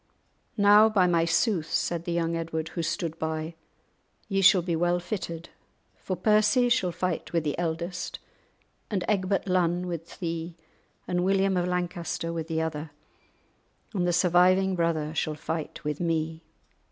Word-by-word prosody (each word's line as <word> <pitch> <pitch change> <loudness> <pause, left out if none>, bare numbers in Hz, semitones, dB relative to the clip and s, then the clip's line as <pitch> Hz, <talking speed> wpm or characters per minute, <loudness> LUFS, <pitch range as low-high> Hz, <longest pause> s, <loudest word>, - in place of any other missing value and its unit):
"Now, 205 +1 +7
by 200 -4 +3
my 170 -2 +3
sooth," 170 -1 +1
said 170 -1 -1
the 175 - -2
young 170 -1 0
Edward, 160 -1 -3
who 170 - -4
stood 165 -1 -3
by, 160 +1 -3 0.7
"Ye 195 -2 0
shall 185 -1 +6
be 170 -1 -1
well 175 +2 +1
fitted, 175 -3 -5 0.5
for 185 - -4
Percy 215 +6 +3
shall 235 -7 +2
fight 180 0 -3
with 170 -2 +1
the 150 -2 -1
eldest, 170 +1 -3 0.7
and 190 -4 -1
Egbert 195 -1 0
Lunn 180 -1 +1
with 170 -2 -6
thee, 165 -1 -4 0.5
and 180 0 0
William 195 0 +2
of 180 0 +1
Lancaster 175 -2 -2
with 165 -1 -4
the 160 -1 -1
other, 155 -1 -4 1.0
and 180 -4 0
the - - +3
surviving 185 +2 +4
brother 160 -3 0
shall 155 -1 -1
fight 160 +1 -5
with 150 -1 -3
me. 165 -1 -1
175 Hz, 155 wpm, -27 LUFS, 165-185 Hz, 1.0 s, Now